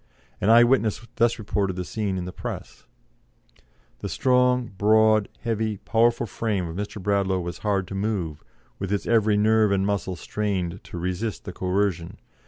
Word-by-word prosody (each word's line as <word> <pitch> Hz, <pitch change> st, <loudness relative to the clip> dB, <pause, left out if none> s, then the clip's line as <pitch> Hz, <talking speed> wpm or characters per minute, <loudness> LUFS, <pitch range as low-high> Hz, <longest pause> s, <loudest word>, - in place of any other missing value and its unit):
An 100 Hz, -, +2 dB
eye 115 Hz, +1 st, +8 dB
witness 120 Hz, -3 st, +1 dB
thus 115 Hz, 0 st, +3 dB
reported 100 Hz, -3 st, -1 dB
the 90 Hz, 0 st, -4 dB
scene 100 Hz, -2 st, -2 dB
in 90 Hz, -, -3 dB
the 90 Hz, -, -5 dB
Press: -, -, -7 dB, 1.1 s
"The -, -, -5 dB
strong, 125 Hz, -1 st, +2 dB
broad, 110 Hz, +1 st, +4 dB
heavy, 110 Hz, -2 st, -1 dB
powerful 115 Hz, +3 st, +2 dB
frame 105 Hz, -4 st, -2 dB
of 80 Hz, -, -7 dB
Mr. 105 Hz, +2 st, -5 dB
Bradlaugh 100 Hz, -1 st, +1 dB
was 85 Hz, -1 st, -5 dB
hard 100 Hz, -3 st, 0 dB
to -, -, -6 dB
move, 95 Hz, -7 st, -2 dB, 0.4 s
with 95 Hz, 0 st, -3 dB
its 100 Hz, -, -1 dB
every 110 Hz, -3 st, +3 dB
nerve 110 Hz, 0 st, +4 dB
and 95 Hz, -1 st, +2 dB
muscle 100 Hz, -2 st, -1 dB
strained 95 Hz, -2 st, -3 dB
to -, -, -8 dB
resist 90 Hz, +5 st, -3 dB
the 100 Hz, -, -6 dB
coercion. 90 Hz, -2 st, -1 dB
105 Hz, 165 wpm, -25 LUFS, 95-110 Hz, 1.1 s, eye